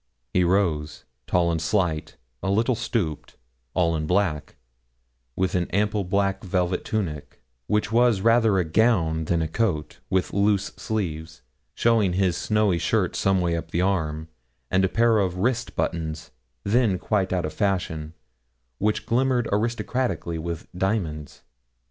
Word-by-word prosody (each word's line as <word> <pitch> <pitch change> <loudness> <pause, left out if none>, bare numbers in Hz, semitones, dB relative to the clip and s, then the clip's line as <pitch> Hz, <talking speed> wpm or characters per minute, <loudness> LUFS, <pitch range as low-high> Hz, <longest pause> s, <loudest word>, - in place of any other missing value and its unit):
He 90 - +3
rose, 85 -5 0 0.2
tall 85 -1 +2
and 80 -1 -1
slight, 80 -2 -1 0.2
a 95 - -2
little 115 +6 +2
stooped, 100 -9 -3 0.4
all 85 -2 +2
in 75 -1 -2
black, 90 -5 0 0.8
with 95 -1 0
an 90 -1 0
ample 105 +1 0
black 100 +1 0
velvet 90 -1 0
tunic, 80 - -4 0.2
which 105 0 0
was 120 -3 +3
rather 115 -2 +4
a 90 - +3
gown 80 -4 +2
than 85 0 +1
a - - -1
coat, 80 -4 -2
with 95 -1 0
loose 100 0 +2
sleeves, 80 -7 -4 0.3
showing 110 -6 +3
his 95 -2 +1
snowy 105 -3 +1
shirt - - 0
some 95 -1 +2
way 85 -1 +1
up 85 - -5
the 85 - 0
arm, 80 -5 -1 0.4
and 95 +1 +3
a 95 - +2
pair 115 0 +3
of 90 -3 0
wrist 120 +5 -1
buttons, 80 -1 -3 0.3
then 110 -2 +2
quite 95 0 0
out 90 -3 0
of 75 - -4
fashion, 85 -5 -2 0.6
which 105 +1 0
glimmered 125 0 +1
aristocratically 115 -4 -1
with 85 0 -5
diamonds. 90 -7 -2
95 Hz, 145 wpm, -24 LUFS, 85-105 Hz, 0.8 s, rather